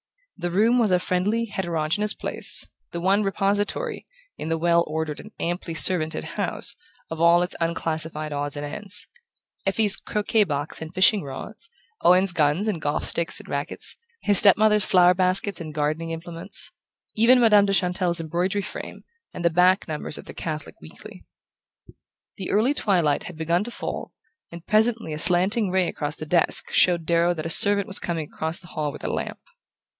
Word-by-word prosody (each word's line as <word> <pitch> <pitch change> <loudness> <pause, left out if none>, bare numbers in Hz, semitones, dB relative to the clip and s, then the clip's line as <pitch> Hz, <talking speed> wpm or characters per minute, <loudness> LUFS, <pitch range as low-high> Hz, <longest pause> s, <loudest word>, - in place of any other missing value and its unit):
The 175 - -4
room 220 +7 +2
was 225 -3 +2
a 180 - +3
friendly 195 +6 -1
heterogeneous 180 0 -1
place, - - +1 0.2
the 170 - -6
one 195 +4 +2
repository, 205 - -1 0.3
in 160 - -6
the 165 - 0
well 170 +1 +2
ordered 155 -1 -4
and 215 - -11
amply 170 -1 -4
servanted 160 -2 +2
house, - - -1 0.4
of 165 0 -5
all 170 +1 +5
its 180 - -1
unclassified 160 -2 -3
odds 145 0 -3
and 145 - -4
ends: 205 +6 0 0.6
Effie's 205 +1 +5
croquet 210 +1 0
box 145 -2 -3
and 160 0 -7
fishing 190 +2 +3
rods, 195 - -9 0.3
Owen's 185 +1 +4
guns 165 +4 +1
and 185 -7 -2
golf 145 +1 -2
sticks 170 - +1
and - - -14
racquets, - - -1 0.3
his 205 -2 +5
step 200 -3 +7
mother's 210 -1 +3
flower 180 -2 +4
baskets 185 +1 -1
and 155 -2 -7
gardening 155 +2 -2
implements, 165 +3 -5 0.4
even 235 +4 +5
Madame 210 -4 +5
de 195 - 0
Chantelle's 180 -2 +1
embroidery 175 +5 -2
frame, 210 - -8 0.3
and 175 - -5
the 170 - +3
back 180 +3 +3
numbers 150 -1 -5
of - - -10
the - - -10
Catholic 155 -2 -6
Weekly. 80 - -13 1.1
The 190 - -6
early 225 +7 +2
twilight 175 - 0
had 180 - -9
begun 170 +3 0
to - - -5
fall, - - -6 0.4
and 170 0 -11
presently 220 -5 +1
a 150 - -5
slanting 190 +5 +3
ray 185 -1 +1
across 150 +1 -4
the 155 - -8
desk 165 +2 +1
showed 175 -2 +3
Darrow 170 +1 +1
that 155 -1 -6
a - - -3
servant 200 +3 +5
was 195 - -1
coming 165 -3 -4
across 160 +1 -3
the 175 - -14
hall 150 -1 -3
with - - -12
a - - -3
lamp. - - -4
175 Hz, 175 wpm, -23 LUFS, 160-200 Hz, 1.1 s, step